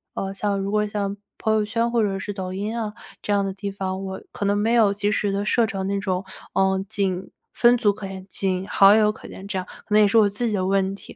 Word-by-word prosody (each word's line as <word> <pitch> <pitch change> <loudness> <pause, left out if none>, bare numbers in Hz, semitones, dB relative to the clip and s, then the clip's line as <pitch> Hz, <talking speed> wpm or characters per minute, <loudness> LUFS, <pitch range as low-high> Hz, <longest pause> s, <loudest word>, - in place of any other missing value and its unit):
呃， 195 0 -3
像 200 0 -1
如 195 +1 -2
果 210 0 +2
像 200 -1 -2 0.2
朋 220 - 0
友 215 -1 +2
圈 230 +2 0
或 235 -2 +2
者 195 -2 -1
是 205 +2 -5
抖 185 -2 -5
音 205 +5 -3
啊 215 -2 -3 0.3
这 205 - -3
样 200 -1 +2
的 195 - -3
地 200 +1 -5
方， 190 -1 -4
我 190 0 -5
可 - - -4
能 205 +1 +2
没 225 +3 +1
有 215 -4 +5
及 205 +1 0
时 205 -1 0
地 200 +1 -1
设 235 +1 +3
成 195 -3 -3
那 200 0 0
种， 185 -1 -2 0.3
呃， 190 0 +2
仅 190 -3 -2 0.2
分 240 0 +5
组 220 -4 +3
可 195 -1 -7
见， 190 0 -8
仅 190 -1 -2
好 195 +1 +7
友 210 -1 +4
可 - - -12
见 195 +1 -10
这 195 -2 -3
样， 185 - -3 0.2
可 210 - 0
能 215 - +7
也 210 - +6
是 200 - -1
我 210 -2 +6
自 220 +4 -2
己 - - -2
的 185 - 0
问 195 0 +1
题。 - - -13
200 Hz, 290 characters per minute, -23 LUFS, 195-210 Hz, 0.3 s, 好